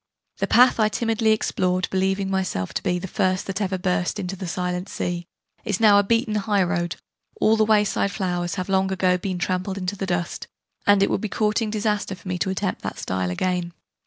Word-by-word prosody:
The - - 0
path 250 0 +5
I 215 -1 +4
timidly 225 0 0
explored 185 -4 +1
believing 190 +1 0
myself 185 - -1
to - - -2
be 180 -2 0
'the 180 - -5
first 185 -1 0
that 195 +2 -3
ever 190 -1 0
burst 180 0 -1
into 190 -1 -4
that 190 -1 -6
silent 180 +2 -3
sea' 175 -1 -3 0.4
is 205 -3 -1
now 210 -2 +7
a - - +3
beaten 230 +1 +1
high 205 -2 +1
road: 175 -1 -1 0.4
all 220 - +4
the 220 -1 +3
way 215 -1 +4
side 200 - 0
flowers 175 -3 -2
have 185 -2 -3
long 190 0 +1
ago 185 -1 +2
been 185 0 -3
trampled 185 +2 -2
into 185 +1 -3
the 195 -1 -4
dust: 175 -1 -2 0.4
and 205 -1 +6
it - - +1
would - - 0
be 215 - -3
courting 215 +1 0
disaster 210 -2 -1
for 185 - -14
me 180 -1 -2
to 190 - 0
attempt 190 0 -2
that - - -5
style 95 -1 -2
again. 175 - -1
190 Hz, 215 wpm, -23 LUFS, 180-205 Hz, 0.4 s, now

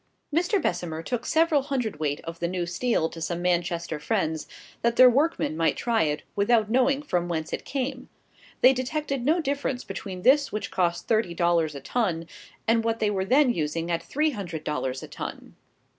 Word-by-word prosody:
Mr. 360 +5 +2
Bessemer 175 - -2
took 240 +5 -3
several 320 -2 +3
hundredweight 220 - -2
of 165 0 -8
the 170 - 0
new 180 0 -2
steel 175 0 0
to 165 - -10
some 170 +1 -2
Manchester 170 -2 -1
friends, 160 -4 -1 0.3
that 235 0 +2
their 255 0 +8
workmen 285 - +1
might 165 0 +1
try 235 -4 +1
it, 150 -2 0
without 215 +1 +2
knowing 265 +3 +3
from 175 -11 -1
whence 160 -2 -3
it - - -4
came. 260 -1 -3 0.5
They 255 +2 +7
detected 275 0 -2
no 315 +7 +3
difference 280 -4 -2
between 185 -3 -6
this 280 +2 +4
which 210 - -4
cost 175 -2 0
thirty 215 -7 +1
dollars 170 -3 +2
a 140 - -7
ton, 170 - -1 0.4
and 230 0 +3
what 225 0 0
they 215 -2 +1
were 190 -2 -1
then 255 +3 +4
using 165 +1 -2
at 170 0 0
three 300 - 0
hundred 175 - -5
dollars 130 -3 -2
a - - -7
ton. - - -7
205 Hz, 185 wpm, -26 LUFS, 170-255 Hz, 0.5 s, their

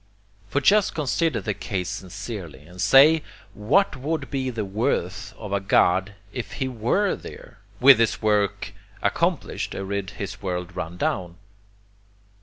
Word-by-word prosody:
] 100 -1 -33
For 140 +7 0
just 205 +7 +4
consider 150 -3 0
the 105 +2 -2
case 95 -2 -4
sincerely, 95 - -7
and 90 +2 -9
say 155 +4 +7 0.3
what 145 - +2
would 140 +1 -3
be 135 -2 -1
the 115 -4 -3
WORTH 95 -2 -2
of 105 -3 -6
a 100 - +2
God 95 0 +2 0.2
if 125 - -5
he 130 - -2
WERE 130 - 0
there, - - -12 0.2
with 135 0 +8
his 115 -2 +2
work 105 -2 0 0.3
accomplished - - -1
and 100 0 -3
his 100 0 -7
world 90 -2 -4
run 90 -1 -5
down. 90 -1 -2
105 Hz, 145 wpm, -24 LUFS, 95-130 Hz, 0.3 s, with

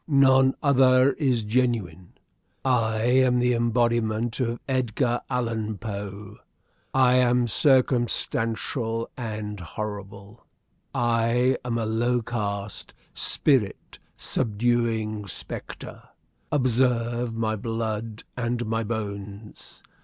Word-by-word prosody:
"None 135 -2 +5
other 130 -1 +5
is 130 -7 0
genuine. 105 -7 -1 0.5
I 115 -4 +1
am 125 +1 +4
the 125 0 +2
embodiment 115 -1 +1
of 120 -2 -1
Edgar 125 -1 0
Allan 115 -4 -2
Poe. 100 -2 -7 0.5
I 130 -1 +4
am 125 -1 +3
circumstantial 120 -3 +1
and 105 -3 -5
horrible. 100 +3 -7 0.4
I 120 +2 +2
am 120 -1 -2
a 115 - -1
low 120 +2 0
caste, 100 -3 -4 0.2
spirit 130 -9 0 0.2
subduing 110 -2 -1
spectre. 90 - -7 0.5
Observe 120 -3 +1
my 110 -1 0
blood 110 0 -4
and 120 -1 -2
my 115 +1 -1
bones. 105 -1 -7
115 Hz, 95 wpm, -25 LUFS, 110-125 Hz, 0.5 s, None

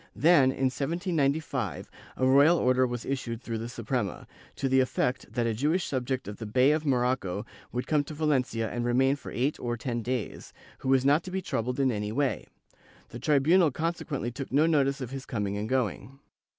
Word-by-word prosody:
Then, 165 -4 +5
in 130 0 0
1795 145 - -1 0.3
a 130 - +1
royal 140 +6 +6
order 130 -1 +3
was 120 -1 -5
issued 125 -4 -3
through 115 -2 -4
the 115 +1 -5
Suprema, 120 -4 -3 0.3
to 135 - -1
the 130 0 +3
effect 130 0 -1
that 120 -1 -1
a 115 - 0
Jewish 150 - 0
subject 130 -1 -2
of 105 - -6
the 110 - -6
Bey 130 +6 +4
of 155 0 0
Morocco 125 -7 0 0.3
would 125 +1 -3
come 150 -2 +2
to 155 - -8
Valencia 130 -7 0
and 120 +2 -3
remain 130 +3 +3
for 140 - -10
eight 135 +5 -1
or 120 -1 -2
ten 120 0 -3
days, 125 -1 -4 0.3
who 130 - -3
was 135 -1 +3
not 145 +4 +4
to - - -6
be 190 +1 -2
troubled 125 0 -2
in 135 -2 +3
any 105 -1 -3
way; 140 +3 -1 0.6
the 120 - -8
tribunal 155 +6 +4
consequently 155 -4 -3
took 130 +2 -7
no 145 +4 +4
notice 140 -4 +2
of 125 -1 -5
his 135 -1 -7
coming 100 -3 -2
and 105 +2 -3
going. 130 +1 -2
130 Hz, 195 wpm, -28 LUFS, 120-145 Hz, 0.6 s, royal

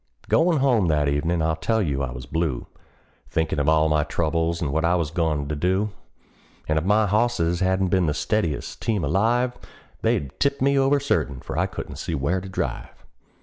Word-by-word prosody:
Goin' 165 0 +3
home 125 -9 +3
that 75 -2 +2
evenin' 80 +4 0
I 80 0 +1
tell 90 +8 0
you 70 -9 -1
I 70 - -2
was - - -8
blue, 80 -4 -2 0.6
Thinkin' 80 -2 -1
of 70 +2 +2
all 80 0 +4
my 75 -1 +2
troubles, 85 +2 -1
and 70 -4 -2
what 80 +1 +1
I 85 +2 +3
was 80 -4 -1
goin' 80 -4 0
to 75 - -2
do; 95 +7 0 0.8
And 80 0 +2
if - - -5
my 105 +4 +3
hosses 100 -5 +1
hadn't 95 0 +1
been 90 -2 +2
the 75 - 0
steadiest 85 -4 -2
team 110 -5 0
alive, 115 - +1 0.5
They'd 70 -2 0
've - - -36
tipped 140 0 +1
me 140 +1 +2
over, 135 +1 +3
certain, 75 - -1
for - - -7
I - - +1
couldn't - - -7
see - - -3
where 80 +7 0
to 95 - -8
drive. 95 - -5
85 Hz, 200 wpm, -24 LUFS, 75-105 Hz, 0.8 s, all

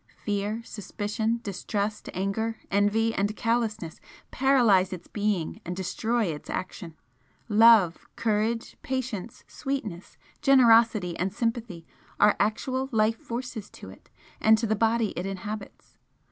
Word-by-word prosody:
Fear, 210 +2 -2
suspicion, 220 +2 -3
distrust, 205 +2 -3
anger, 220 +4 -2
envy 205 +3 +2
and 205 +1 -1
callousness 225 -8 -1 0.3
paralyse 240 -9 +4
its 185 -2 -7
being 205 -6 -2
and 180 - -5
destroy 220 +5 -1
its 155 -5 -5
action, 175 -3 -5 0.5
love, 215 -5 +6 0.2
courage, 225 +1 -1
patience, 250 -5 -4
sweetness, 225 - -5 0.2
generosity 230 - +5
and 185 +2 0
sympathy 225 -6 -3 0.3
are 210 0 +5
actual 255 +6 -1
life 220 0 +2
forces 235 -3 -6
to - - -11
it - - -18 0.3
and 220 0 +5
to 230 - -1
the 220 0 +1
body 225 0 +2
it 180 +2 -3
inhabits. 205 +2 -7
215 Hz, 120 wpm, -27 LUFS, 195-230 Hz, 0.5 s, love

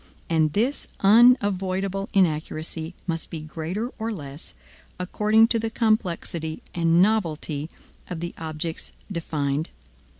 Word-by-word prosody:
And 155 -2 +3
this 245 +7 0
unavoidable 195 -3 +4
inaccuracy 160 -1 0
must 165 -2 -3
be 160 - -5
greater 165 +9 -4
or 225 +1 -2
less, 145 -6 -7 0.4
according 215 +4 +3
to 230 - +2
the 225 0 -1
complexity 180 -8 -1
and 170 +1 +4
novelty 160 -7 0 0.4
of 175 - -4
the 170 +1 -4
objects 160 +1 -3 0.2
defined. 155 -3 -1
175 Hz, 110 wpm, -25 LUFS, 160-210 Hz, 0.4 s, unavoidable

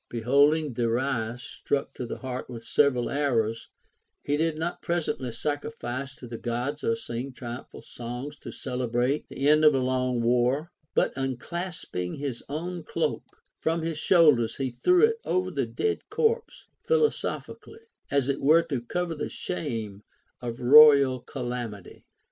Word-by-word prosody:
Beholding 140 +5 +3
Darius 120 0 -1
stuck 140 - -2
to 125 - -5
the - - -5
heart 130 -1 -5
with 115 -2 -8
several 130 -3 +2
arrows, 115 -6 0 0.5
he 145 - 0
did 160 +1 0
not 170 +2 -3
presently 160 -7 -2
sacrifice 140 -1 -4
to - - -11
the 115 -1 -7
Gods 125 +5 -3
or 230 - +2
sing 130 - -5
triumphal 120 +1 -8
songs 125 +5 -7
to - - -8
celebrate 125 +2 -1
the 135 +2 -1
end 155 +1 +5
of 150 -1 +7
so 135 -1 +1
long 130 0 0
a 120 -1 0
war, 125 +7 +2 0.2
but - - +2
unclasping 135 - -4
his 140 -4 -4
own 170 +3 -4
cloak 155 -1 -1 0.4
from 165 0 0
his 160 -1 -2
shoulders 150 -11 +4
he 135 -2 -2
threw 360 - +4
it 455 0 0
over 370 - 0
the - - -1
dead 435 -1 -1
corpse 465 +1 0 0.2
philosophically, 455 -1 -1 0.3
as 140 -2 +1
it 140 -1 -1
were 160 +4 +5
to 135 -7 -3
cover 175 +8 -2
the 155 - -4
shame 115 - -4 0.4
of 120 0 -5
royal 140 -1 +8
calamity. 120 -6 -6
135 Hz, 150 wpm, -27 LUFS, 120-155 Hz, 0.5 s, royal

